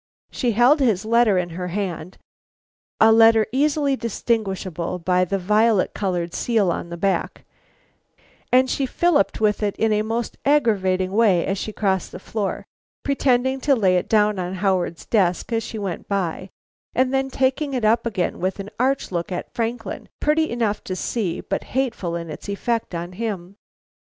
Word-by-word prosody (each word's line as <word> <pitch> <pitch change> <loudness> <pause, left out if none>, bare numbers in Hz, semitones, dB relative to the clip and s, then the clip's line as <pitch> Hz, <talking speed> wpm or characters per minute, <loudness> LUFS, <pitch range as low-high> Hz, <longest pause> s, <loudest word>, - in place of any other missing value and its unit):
She 245 -3 0
held 245 +7 +5
his 220 -8 +1
letter 230 -3 +4
in 180 -1 -1
her 180 +2 -4
hand, 180 -2 -4 0.8
a 220 0 +7
letter 225 -1 +6
easily 285 +1 +1
distinguishable 195 -7 -2
by 180 +1 +1
the 195 +3 -1
violet 210 +2 +2
colored 180 -3 -2
seal 215 -7 +1
on 170 - -4
the 170 - -6
back, 185 -1 -1 1.1
and 255 +1 +5
she 270 +1 -1
filliped 340 +3 +1
with 210 -1 +1
it 205 -2 -1
in 220 -1 +1
a 210 - +2
most 225 +2 -3
aggravating 195 -10 +2
way 200 -5 +3
as 195 0 -2
she 215 - -4
crossed 190 -3 -1
the - - -7
floor, 205 0 -3 0.4
pretending 265 -1 +1
to 280 0 +3
lay 190 -6 +3
it 180 - -1
down 210 -2 +3
on 180 +1 -3
Howard's 185 -3 -1
desk 190 +1 +1
as 225 - +1
she 225 - -6
went 195 -5 -5
by 190 -1 -2 0.5
and 255 +1 +2
then 270 0 +1
taking 265 +2 0
it 245 -4 0
up 225 +2 +3
again 190 -6 -2
with 190 +3 -2
an 200 +1 -6
arch 265 -1 0
look 170 0 -3
at 180 - -5
Franklin, 230 -2 -4
pretty 310 +1 +2
enough 225 -3 -1
to 185 - -3
see 185 -1 -2
but - - -3
hateful 225 -10 -1
in 170 -2 -5
its 155 - -8
effect 225 -1 -2
on 170 +1 -5
him. 195 -2 -5
210 Hz, 170 wpm, -22 LUFS, 185-240 Hz, 1.1 s, a